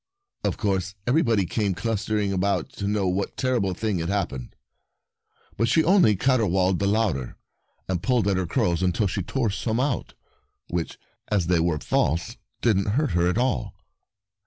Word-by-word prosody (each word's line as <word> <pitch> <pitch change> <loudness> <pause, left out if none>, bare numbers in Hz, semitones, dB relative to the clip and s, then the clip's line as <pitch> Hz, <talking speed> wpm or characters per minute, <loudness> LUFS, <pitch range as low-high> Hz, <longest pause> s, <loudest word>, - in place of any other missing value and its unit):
Of - - -1
course 95 -2 -1
everybody 120 - +2
came 100 +1 -1
clustering 105 +1 -1
about 100 +6 0
to 100 - -2
know 100 -2 +1
what 95 +2 -2
terrible 120 -8 0
thing 105 -2 -1
had 85 +1 -2
happened; 70 -11 -3 1.0
but 115 - +2
she 160 +6 +3
only 175 - +5
caterwauled 95 -6 +2
the 100 - +1
louder, 100 - 0 0.5
and 90 -2 -1
pulled 125 -6 +1
at 100 - +2
her 95 -1 -1
curls 85 0 +1
until 90 +3 +1
she 100 +1 -1
tore 110 +4 -1
some 110 +3 -2
out 135 -1 -1 0.3
— - - -49
which, 85 -2 -3 0.3
as 100 -5 +1
they 85 0 +2
were 85 -1 +1
false, 85 - 0 0.2
didn't 105 -5 +2
hurt 150 0 +1
her 85 0 +2
at 90 - 0
all. 120 -5 0
100 Hz, 165 wpm, -25 LUFS, 90-115 Hz, 1.0 s, only